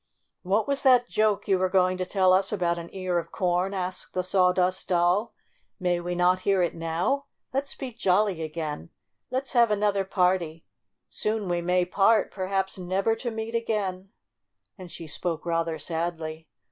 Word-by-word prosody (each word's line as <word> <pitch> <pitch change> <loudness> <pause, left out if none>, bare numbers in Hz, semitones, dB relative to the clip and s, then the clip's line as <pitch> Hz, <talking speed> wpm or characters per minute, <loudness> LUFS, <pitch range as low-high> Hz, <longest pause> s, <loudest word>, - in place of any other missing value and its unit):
"What 200 +4 +1
was 280 0 +1
that 250 -3 +5
joke 215 -3 +1
you 190 -2 +3
were 185 0 +1
going 185 -1 +3
to 185 0 -3
tell 185 -1 +3
us 190 +1 +3
about 175 -4 0
an 170 0 -8
ear 185 -2 -1
of 170 - -8
corn?" 180 +2 0
asked 185 -1 -4
the 185 - 0
THE - - -5
LITTLE - - -5
GIRL 185 -2 +4
35 180 - +1 0.2
Sawdust 185 - -4
Doll. 180 +6 +2 0.2
' - - -43
6 - - -30
May 175 -1 +1
we 175 +1 -3
not 180 +1 +3
hear 190 -1 +2
it 175 - 0
now? 170 +12 -1 0.3
Let's 275 +1 -2
be 260 -3 -6
jolly 195 -4 +1
again! 155 0 -5 0.4
Let's 260 +2 -2
have 235 -2 +5
another 205 -1 +1
party! 180 -4 0 0.4
Soon 215 -2 -2
we 175 -1 0
may 180 +1 +2
part, 195 +4 +3
perhaps 190 0 -2
never 190 +5 0
to 240 +1 -3
meet 225 0 -5
again," 200 -5 -2 0.7
and 180 -2 -11
she 165 - -8
spoke 165 +1 -3
rather 165 -1 -1
sadly. 160 0 -4
185 Hz, 190 wpm, -26 LUFS, 175-210 Hz, 0.7 s, that